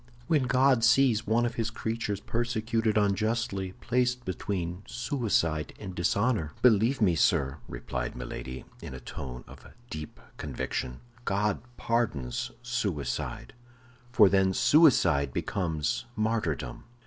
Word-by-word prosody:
"When 150 Hz, -6 st, +2 dB
God 130 Hz, -1 st, +3 dB
sees 125 Hz, -2 st, +4 dB
one 115 Hz, +2 st, +3 dB
of 120 Hz, -, -2 dB
his 115 Hz, -1 st, -1 dB
creatures 110 Hz, -3 st, -3 dB
persecuted 115 Hz, -2 st, -1 dB
unjustly, 105 Hz, -1 st, 0 dB
placed 125 Hz, 0 st, 0 dB
between 90 Hz, -1 st, -3 dB
suicide 105 Hz, -, -1 dB
and 95 Hz, -3 st, -7 dB
dishonor, 90 Hz, -1 st, 0 dB
believe 115 Hz, +1 st, +4 dB
me, 90 Hz, -4 st, +4 dB
sir," 70 Hz, -2 st, +2 dB
replied -, -, -4 dB
Milady, 65 Hz, +1 st, -6 dB, 0.2 s
in 65 Hz, -, -7 dB
a -, -, -7 dB
tone 60 Hz, 0 st, -7 dB
of -, -, -13 dB, 0.2 s
deep 75 Hz, -4 st, -7 dB, 0.2 s
conviction, 60 Hz, -1 st, -4 dB, 0.2 s
"God 105 Hz, 0 st, 0 dB, 0.2 s
pardons 110 Hz, -, -1 dB
suicide, -, -, -3 dB, 0.6 s
for 110 Hz, -5 st, +7 dB
then 95 Hz, -1 st, +3 dB
suicide 90 Hz, -, +5 dB
becomes 80 Hz, -, -2 dB
martyrdom." 105 Hz, -, -2 dB
105 Hz, 115 wpm, -28 LUFS, 80-120 Hz, 0.6 s, for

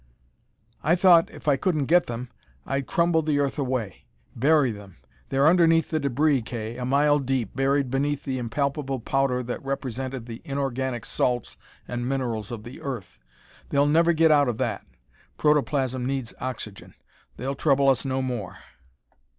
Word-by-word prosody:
"I 165 Hz, -, +3 dB
thought, 175 Hz, -2 st, +5 dB
if -, -, -13 dB
I 140 Hz, -2 st, +4 dB
couldn't 155 Hz, -2 st, 0 dB
get 175 Hz, +4 st, +4 dB
them, 120 Hz, +1 st, -5 dB, 0.4 s
I'd 135 Hz, -1 st, -2 dB
crumble 170 Hz, -1 st, +2 dB
the 150 Hz, -2 st, 0 dB
earth 140 Hz, 0 st, 0 dB
away 125 Hz, -8 st, -3 dB, 0.3 s
bury 140 Hz, 0 st, +3 dB
them. 100 Hz, -3 st, -11 dB, 0.3 s
They're 135 Hz, +1 st, +2 dB
underneath 165 Hz, -1 st, +4 dB
the 155 Hz, -, +1 dB
debris, 140 Hz, 0 st, +2 dB
Kay, 115 Hz, 0 st, -5 dB
a 125 Hz, -, -3 dB
mile 145 Hz, +3 st, +3 dB
deep, 130 Hz, -5 st, -2 dB
buried, 135 Hz, -1 st, +1 dB
beneath 145 Hz, +2 st, 0 dB
the 130 Hz, -2 st, -3 dB
impalpable 135 Hz, +3 st, -2 dB
powder 130 Hz, +1 st, 0 dB
that 120 Hz, +2 st, -5 dB
represented 130 Hz, -2 st, -4 dB
the 115 Hz, -1 st, -8 dB
inorganic 130 Hz, -4 st, -3 dB
salts 125 Hz, -2 st, -1 dB, 0.3 s
and 120 Hz, 0 st, -3 dB
minerals 120 Hz, -6 st, -2 dB
of 115 Hz, -3 st, -6 dB
the 120 Hz, +3 st, -10 dB
earth. 125 Hz, -9 st, -6 dB, 0.5 s
They'll 140 Hz, 0 st, +3 dB
never 165 Hz, +3 st, +4 dB
get 160 Hz, -1 st, +4 dB
out 145 Hz, -2 st, +5 dB
of 115 Hz, -, -2 dB
that. -, -, -2 dB, 0.5 s
Protoplasm 140 Hz, -4 st, +1 dB
needs 130 Hz, -2 st, -3 dB
oxygen. 115 Hz, -5 st, -6 dB, 0.4 s
They'll 135 Hz, +3 st, -3 dB
trouble 140 Hz, 0 st, +2 dB
us 130 Hz, -4 st, +3 dB
no 130 Hz, -1 st, -1 dB
more. 120 Hz, -8 st, -4 dB
135 Hz, 160 wpm, -25 LUFS, 125-145 Hz, 0.5 s, thought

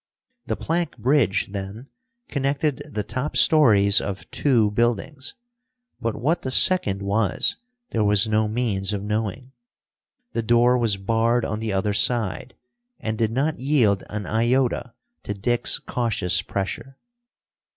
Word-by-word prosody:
The -, -, -1 dB
plank 170 Hz, -1 st, -2 dB
bridge, 120 Hz, -6 st, +1 dB
then, 100 Hz, +5 st, -7 dB, 0.4 s
connected 140 Hz, +1 st, -1 dB
the 105 Hz, -5 st, -3 dB
top 125 Hz, +7 st, -4 dB
stories 105 Hz, -10 st, +5 dB
of 100 Hz, -1 st, -6 dB
two 115 Hz, -7 st, +2 dB
buildings, 120 Hz, +5 st, -2 dB, 0.7 s
but 115 Hz, -2 st, -2 dB
what 155 Hz, +7 st, 0 dB
the 130 Hz, -, -3 dB
second 120 Hz, -, +4 dB
was, 100 Hz, +1 st, 0 dB, 0.3 s
there 110 Hz, -, 0 dB
was 105 Hz, +1 st, +3 dB
no 110 Hz, 0 st, +1 dB
means 105 Hz, -3 st, -1 dB
of 100 Hz, -1 st, -3 dB
knowing. 110 Hz, +4 st, -3 dB, 0.8 s
The 115 Hz, -, -1 dB
door 120 Hz, +2 st, +3 dB
was 115 Hz, -5 st, +1 dB
barred 115 Hz, +4 st, +1 dB
on 105 Hz, -, -3 dB
the 110 Hz, -1 st, -3 dB
other 95 Hz, +1 st, 0 dB
side, 120 Hz, +2 st, -1 dB, 0.4 s
and 110 Hz, 0 st, -3 dB
did 110 Hz, 0 st, 0 dB
not 140 Hz, +6 st, -1 dB
yield 125 Hz, -8 st, +2 dB
an 105 Hz, -1 st, -5 dB
iota 120 Hz, +2 st, 0 dB, 0.3 s
to 105 Hz, -, -5 dB
Dick's 120 Hz, +5 st, +1 dB
cautious 100 Hz, -7 st, 0 dB
pressure. 100 Hz, +8 st, -5 dB
115 Hz, 135 wpm, -23 LUFS, 105-130 Hz, 0.8 s, stories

